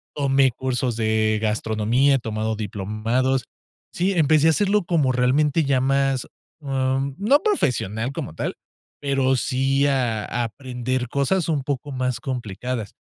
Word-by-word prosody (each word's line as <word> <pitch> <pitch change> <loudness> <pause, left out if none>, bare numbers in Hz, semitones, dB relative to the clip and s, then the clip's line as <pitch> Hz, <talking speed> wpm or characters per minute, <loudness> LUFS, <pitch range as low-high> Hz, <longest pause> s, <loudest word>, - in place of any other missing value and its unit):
Tomé 135 -2 +3
cursos 125 -1 -2
de 110 -1 +1
gastronomía, 110 +5 +1
he - - +1
tomado 110 -1 -2
diplomados. 110 +6 -1 0.5
Sí, 185 +3 +1
empecé 155 -2 +4
a - - +6
hacerlo 205 +4 +2
como 155 -7 +2
realmente 135 +5 +2
ya 135 -2 +2
más, 135 -1 +1 0.4
em, 135 -1 -1
no 235 +9 +4
profesional 125 - 0
como 80 - -5
tal, - - -3 0.4
pero 135 -2 +1
sí, 135 +2 +1
ah, 125 -6 0
a 120 0 -2
aprender 125 +1 -3
cosas 150 +7 0
un 150 -3 +1
poco 140 +1 -3
más 130 -2 -2
complicadas. 125 -3 -4
130 Hz, 140 wpm, -23 LUFS, 115-140 Hz, 0.5 s, a